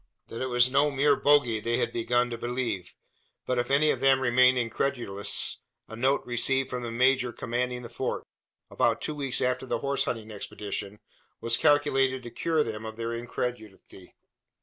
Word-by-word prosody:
That 115 - -6
it 130 - -1
was 125 0 +3
no 140 +2 +3
mere 140 +1 +3
"bogie" 135 -6 +3
they 115 +2 -1
had - - -1
begun 120 +1 +1
to - - -2
believe; 120 -7 -3 0.5
but 125 -1 0
if 120 - -2
any 145 +2 +4
of - - -2
them 135 -1 +4
remained 130 0 +4
incredulous, 115 -4 -1 0.3
a 110 - -9
note 130 +4 +1
received 130 +2 +1
from 125 - -3
the 120 - -4
major 125 +1 +2
commanding 125 +1 -3
the - - -6
Fort 125 +2 -3 0.5
about - - +1
two 155 - -2
weeks 140 -3 -2
after 125 +1 -1
the - - -1
horse 140 0 -1
hunting 110 -2 -4
expedition 105 0 -6 0.4
was 115 0 +1
calculated 135 -3 +2
to 120 - -8
cure 160 -2 0
them 110 -3 -5
of 110 0 -7
their 115 0 -3
incredulity. 115 -5 -6
125 Hz, 175 wpm, -27 LUFS, 115-135 Hz, 0.5 s, any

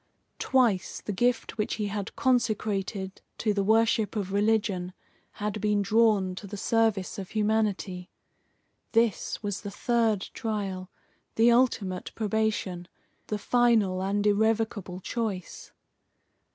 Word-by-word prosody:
Twice 240 -9 +2
the - - -5
gift 235 +2 0
which 210 - 0
he 215 - -2
had 205 0 -4
consecrated 215 -7 0 0.2
to 215 -2 +1
the 200 -1 0
worship 220 0 +2
of 195 -2 -3
religion 205 -3 +1 0.4
had 210 -1 -3
been 210 -1 +2
drawn 210 -3 +3
to 200 - -7
the 205 +1 -7
service 220 -3 +1
of 190 -1 -6
humanity. 210 -4 -1 0.8
This 230 -1 +1
was 205 -2 -3
the 205 - -5
third 220 0 +1
trial, 195 -5 -3 0.5
the 230 +2 +5
ultimate 225 -7 +1
probation, 210 -5 -1 0.4
the 210 - -2
final 220 -5 +2
and 200 +2 0
irrevocable 210 -3 +1
choice. 205 -5 -4
210 Hz, 120 wpm, -28 LUFS, 195-225 Hz, 0.8 s, the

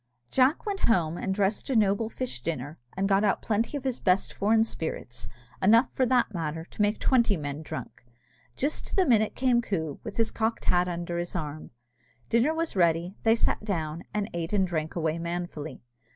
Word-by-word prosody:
Jack 265 - +3
went 405 -2 -2
home, 170 -7 +2
and 190 - -2
dressed 200 +4 0
a 265 - +1
noble 215 +1 +2
fish 240 - -4
dinner, 145 0 -4 0.2
and 195 +1 +1
got 195 +1 +3
out 200 - +2
plenty 225 +6 0
of 275 - -7
his 260 -2 -1
best 185 0 +2
foreign 220 +2 +3
spirits, 125 - -5 0.3
enough, 230 +6 +5
for 260 -2 +1
that 245 -3 +2
matter, 160 -1 -3
to 205 - -6
make 205 +1 +2
twenty 235 -7 +3
men 145 0 -4
drunk. 155 - -7 0.5
Just 285 +3 -2
to - - -4
the 380 - +4
minute 220 -5 +3
came 250 -2 +3
Coo, 160 - -3
with - - -7
his 225 -1 +2
cocked 225 +1 -1
hat 180 0 +3
under 170 0 -3
his 175 +1 -4
arm. 155 -3 -4 0.6
Dinner 235 +6 +3
was 330 -5 -2
ready, 170 0 +2
they 225 0 +4
sat 230 - 0
down, 165 -5 -3
and 210 -1 -1
ate 170 +2 -3
and 195 -2 +3
drank 160 -3 -3
away 165 -1 0
manfully. 170 -4 -5
195 Hz, 195 wpm, -27 LUFS, 165-230 Hz, 0.6 s, enough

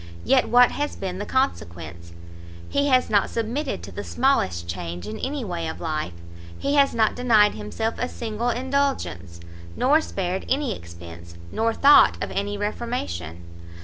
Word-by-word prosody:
yet 265 -2 +3
what 245 0 +6
has 290 0 -3
been 185 -1 -5
the 205 - -4
consequence? 85 - -2 0.6
he 280 0 +1
has 255 -2 +4
not 205 -2 +2
submitted 240 +6 -3
to - - -8
the 205 - -6
smallest 95 - +1
change 85 0 -5
in 105 - -6
his 275 -2 -3
way 170 -4 -3
of 160 - -6
life, 155 - -3 0.4
he 280 - -1
has 280 -3 +4
not 220 -2 +2
denied 220 -4 +4
himself 105 - -3
a 250 - -1
single 230 +1 -3
indulgence, 250 - -2 0.4
nor 290 +5 +4
spared 190 - -3
any 265 -5 0
expence, 85 0 -12 0.2
nor 225 +1 +1
thought 280 +5 +6
of - - -4
any 205 +1 -2
reformation. 95 - -4
210 Hz, 155 wpm, -24 LUFS, -, 0.6 s, what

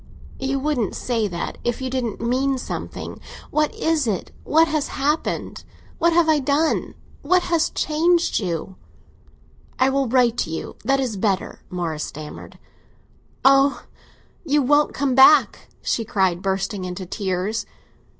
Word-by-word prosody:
"You 270 +1 -1
wouldn't 270 -7 -1
say 230 -4 -1
that 175 -3 -5
if 240 -1 -1
you 260 - -3
didn't 250 -4 -3
mean 260 +3 0
something. 255 - -6 0.3
What 305 -1 +1
is 320 -5 0
it?—what 300 - +1
has 305 -2 -1
happened?—what 305 +3 -2
have 335 -1 +3
I 310 -1 +4
done?—what 310 +4 0
has 335 -2 +1
changed 335 +3 +1
you?" 180 -1 -4 1.0
"I 260 +1 +3
will 275 -1 +1
write 240 -1 +3
to - - -1
you—that 270 +11 -2
is 245 -6 -2
better," 195 -1 -1
Morris 165 -4 -3
stammered. 150 0 -9 0.9
"Ah, 275 +1 +5 0.6
you 295 -3 +2
won't 290 +3 +3
come 270 -2 0
back!" 265 +4 +5 0.2
she 230 - 0
cried, 190 -4 0
bursting 195 +1 -2
into 185 +1 -5
tears. 190 +3 -2
260 Hz, 130 wpm, -22 LUFS, 195-295 Hz, 1.0 s, Ah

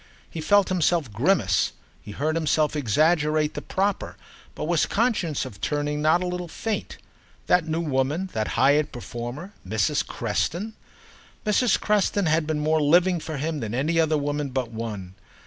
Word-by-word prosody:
He 165 - -6
felt 205 +4 +4
himself 170 - +1
grimace, 115 - +2 0.3
he - - -13
heard 150 +9 -1
himself 155 -2 +1
exaggerate 150 +4 +2
the - - -5
proper, 195 +1 -2 0.4
but - - -5
was 165 0 +1
conscious 200 - 0
of 105 -6 -10
turning 150 0 -1
not 160 +4 +3
a - - -2
little 180 0 -3
faint. 215 +6 -4 0.5
That 180 -2 +3
new 160 +1 -1
woman, 150 +5 -1
that 110 -1 -1
hired 145 +4 +3
performer, 120 - -7
Mrs. 100 +1 0
Creston? 205 +7 -2 0.7
Mrs. 215 +3 +3
Creston 205 -2 +1
had 160 -1 +2
been 155 -1 0
more 155 +1 +2
living 175 +4 +4
for 155 -1 -5
him 155 +2 -2
than 110 -2 -4
any 160 +5 +2
woman 145 -2 -1
but 130 -3 -3
one. 105 -5 -6
155 Hz, 155 wpm, -25 LUFS, 135-175 Hz, 0.7 s, felt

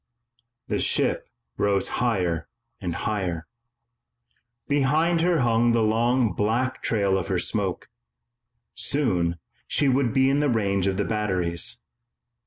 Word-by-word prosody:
The - - -1
ship - - +1 0.3
rose 100 -1 +1
higher 90 -9 0 0.3
and 85 -5 -4
higher. 90 -5 -2 1.2
Behind 155 +4 +2
her 170 -3 +2
hung 120 0 +3
the 115 -1 +2
long 115 0 +2
black 115 +6 -1
trail 100 -4 +1
of 85 - -5
her - - 0
smoke. - - -2 0.9
Soon, 90 - 0 0.3
she 145 - +2
would 130 -2 +2
be 130 +3 +3
in 140 +1 +2
the 145 -1 +2
range 100 -5 +1
of 95 -1 0
the 100 - 0
batteries. 95 -6 -1
110 Hz, 125 wpm, -25 LUFS, 95-130 Hz, 1.2 s, hung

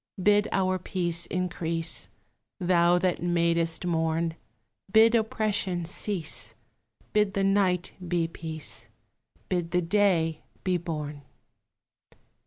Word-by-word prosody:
Bid 205 +1 +4
our 185 -1 +1
peace 175 -2 -1
increase, 165 - -1 0.5
Thou 175 -1 +4
that 180 -1 0
madest 170 -1 +1
morn; 165 -1 0 0.6
Bid 225 +3 +6
oppression 215 -5 0
cease; 175 -1 -1 0.6
Bid 210 -2 +2
the 195 - +1
night 195 -2 +2
be 170 -1 +1
peace; 155 -8 -6 0.6
Bid 175 -2 -1
the 180 +1 +1
day 165 -4 +2 0.2
be 185 -1 +1
born. 150 -4 -5
175 Hz, 100 wpm, -27 LUFS, 165-195 Hz, 0.6 s, Bid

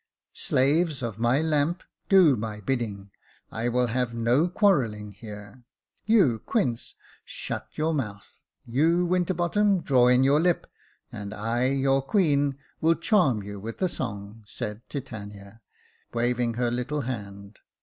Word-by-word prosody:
" - - -60 0.2
Slaves 145 +2 +2
of 110 -3 -4
my 120 +6 +2
lamp, 160 +3 0 0.3
do 185 -8 +6
my 105 -1 -5
bidding. 105 -4 -3 0.4
I 115 +3 -2
will 125 +1 +2
have 120 0 -1
no 120 +8 +2
quarrelling 125 - +1
here. 105 +3 -11 0.4
You, 185 - +4
Quince, 125 - -2 0.3
shut 110 -1 -5
your 160 +1 0
mouth; 105 -9 -5 0.2
you, 165 +9 +2
Winterbottom, 180 +2 +1
draw 125 -3 +4
in 125 +1 +5
your 140 +3 +4
lips 175 +1 +1 0.4
and 105 0 -7
I, 115 +4 -1
your 135 0 +2
queen, 145 -4 +1 0.2
will 165 +1 +4
charm 145 - +2
you 100 0 -7
with 115 +3 -7
a - - +4
song," 105 - -6
said 105 0 -6
Titania, 105 -5 -8 0.5
waving 120 0 0
her 120 0 0
little 135 +5 -2
hand. 100 -5 -7
125 Hz, 140 wpm, -26 LUFS, 110-155 Hz, 0.5 s, do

